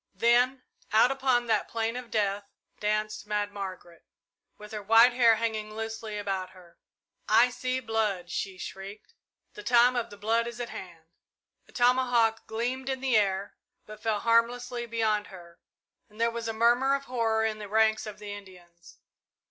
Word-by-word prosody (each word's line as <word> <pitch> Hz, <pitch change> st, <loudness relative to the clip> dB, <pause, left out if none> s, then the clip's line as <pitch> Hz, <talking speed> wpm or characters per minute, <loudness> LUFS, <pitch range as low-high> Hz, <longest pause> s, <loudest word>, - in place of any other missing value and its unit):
Then 250 Hz, +2 st, +3 dB, 0.3 s
out 225 Hz, +4 st, +5 dB
upon 260 Hz, -3 st, +1 dB
that 220 Hz, -3 st, +1 dB
plain 225 Hz, 0 st, -2 dB
of 250 Hz, -1 st, -7 dB
death 205 Hz, -1 st, -1 dB, 0.3 s
danced 215 Hz, 0 st, -2 dB
Mad 205 Hz, -1 st, -1 dB
Margaret, 185 Hz, -4 st, -8 dB, 0.5 s
with 210 Hz, 0 st, -12 dB
her 215 Hz, -1 st, -5 dB
white 225 Hz, +4 st, +6 dB
hair 235 Hz, -2 st, +5 dB
hanging 215 Hz, -1 st, -3 dB
loosely 220 Hz, -1 st, -5 dB
about 195 Hz, -2 st, -3 dB
her. 180 Hz, -2 st, -18 dB, 0.5 s
"I 235 Hz, +3 st, +5 dB
see 255 Hz, +1 st, -2 dB
blood!" 215 Hz, -7 st, -2 dB
she 190 Hz, -2 st, -3 dB
shrieked. 195 Hz, -, -9 dB, 0.4 s
"The -, -, -9 dB
time 240 Hz, +3 st, +4 dB
of 235 Hz, -1 st, -2 dB
the 205 Hz, -, -12 dB
blood 225 Hz, +3 st, 0 dB
is 235 Hz, 0 st, -7 dB
at 240 Hz, -, -4 dB
hand!" 170 Hz, -3 st, -10 dB, 0.6 s
A -, -, -19 dB
tomahawk 245 Hz, -3 st, +2 dB
gleamed 250 Hz, +4 st, -3 dB
in 265 Hz, -1 st, -2 dB
the 260 Hz, -2 st, +1 dB
air, 200 Hz, -1 st, +1 dB, 0.3 s
but 215 Hz, 0 st, -11 dB
fell 215 Hz, -2 st, -1 dB
harmlessly 240 Hz, +1 st, +1 dB
beyond 220 Hz, -2 st, 0 dB
her, 170 Hz, -2 st, -14 dB, 0.5 s
and 210 Hz, +1 st, -18 dB
there 230 Hz, 0 st, +2 dB
was 230 Hz, 0 st, -5 dB
a -, -, -1 dB
murmur 240 Hz, +5 st, +3 dB
of 275 Hz, -, -4 dB
horror 225 Hz, -3 st, 0 dB
in 215 Hz, -1 st, -2 dB
the 210 Hz, -1 st, -8 dB
ranks 220 Hz, 0 st, +2 dB
of 210 Hz, -, -8 dB
the 210 Hz, -1 st, -7 dB
Indians. 180 Hz, -4 st, -14 dB
220 Hz, 170 wpm, -28 LUFS, 205-240 Hz, 0.6 s, white